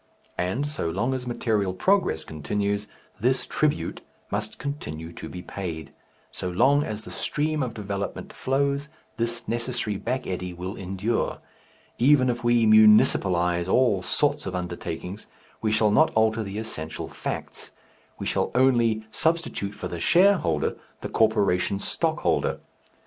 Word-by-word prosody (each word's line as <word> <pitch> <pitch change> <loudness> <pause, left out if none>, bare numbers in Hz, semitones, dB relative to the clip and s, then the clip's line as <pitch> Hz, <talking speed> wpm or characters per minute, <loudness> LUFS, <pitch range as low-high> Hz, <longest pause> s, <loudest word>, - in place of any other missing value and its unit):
And 95 +11 0
so 145 - -3
long 115 +10 0
as 125 -1 -4
material 105 -6 0
progress 185 - +2
continues, 100 +7 -2 0.3
this - - +1
tribute - - -1 0.3
must 105 +1 -3
continue 80 - -5
to 80 - -8
be 90 +2 -8
paid; 80 -6 -6 0.4
so 90 - -4
long 130 +10 +4
as 110 -3 -5
the - - -9
stream 150 0 -1
of 125 -3 -3
development 100 -1 -4
flows, 140 +2 0 0.3
this 115 0 -2
necessary 115 -3 -2
back 125 +5 -2
eddy 90 -1 -4
will 90 +3 -5
endure. 95 +4 -2 0.6
Even 130 0 +5
if 120 0 -5
we 120 -1 +4
"municipalize" 95 -5 +5
all 120 -7 +3
sorts 145 +7 +1
of 95 - -3
undertakings 90 +2 -5 0.3
we 110 - +1
shall 110 -1 +3
not 155 +10 +5
alter 110 0 +3
the 100 -1 -5
essential 80 -8 -5
facts, - - -6 0.5
we - - -5
shall - - 0
only 120 -4 +3
substitute 160 -10 0
for - - -5
the 85 - -5
shareholder 170 - +3 0.2
the - - -4
corporation 100 -3 +2
stockholder. - - 0
110 Hz, 140 wpm, -25 LUFS, 90-125 Hz, 0.6 s, Even